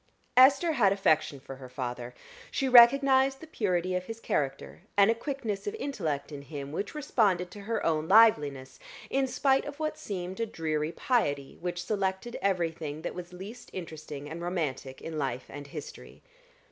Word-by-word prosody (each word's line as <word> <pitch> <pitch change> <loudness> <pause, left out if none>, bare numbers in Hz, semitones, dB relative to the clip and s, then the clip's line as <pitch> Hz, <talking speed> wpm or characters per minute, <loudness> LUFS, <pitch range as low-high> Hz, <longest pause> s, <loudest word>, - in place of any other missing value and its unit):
Esther 275 +6 +6
had 230 -10 +4
affection 155 -7 +2
for 135 -1 -10
her 130 -1 -10
father: 125 -1 -5 0.3
she 270 - -1
recognized 265 +2 +6
the - - -10
purity 185 - -1
of 180 0 -1
his 225 +2 -7
character, 135 -8 -2 0.2
and 200 +2 +6
a - - +3
quickness 230 - -4
of 415 - -2
intellect 170 - -3
in 145 -1 -7
him 140 -1 -7
which 200 - -4
responded 200 -11 +1
to 205 - -10
her 230 - -1
own 160 -1 +1
liveliness, 150 -11 +4 0.3
in 270 0 +2
spite 270 +1 +2
of 290 0 -7
what 310 0 -2
seemed 185 -1 -5
a 230 - +1
dreary 155 -5 -2
piety, 145 - 0
which 175 0 -3
selected 195 +3 -2
everything 165 -5 -1
that - - -3
was 175 0 -8
least 200 +7 -9
interesting 155 -5 -7
and 165 +3 -7
romantic 150 -7 -3
in 160 -1 -4
life 130 -3 -2
and 145 0 -8
history. 150 0 -10
180 Hz, 170 wpm, -29 LUFS, 150-235 Hz, 0.3 s, Esther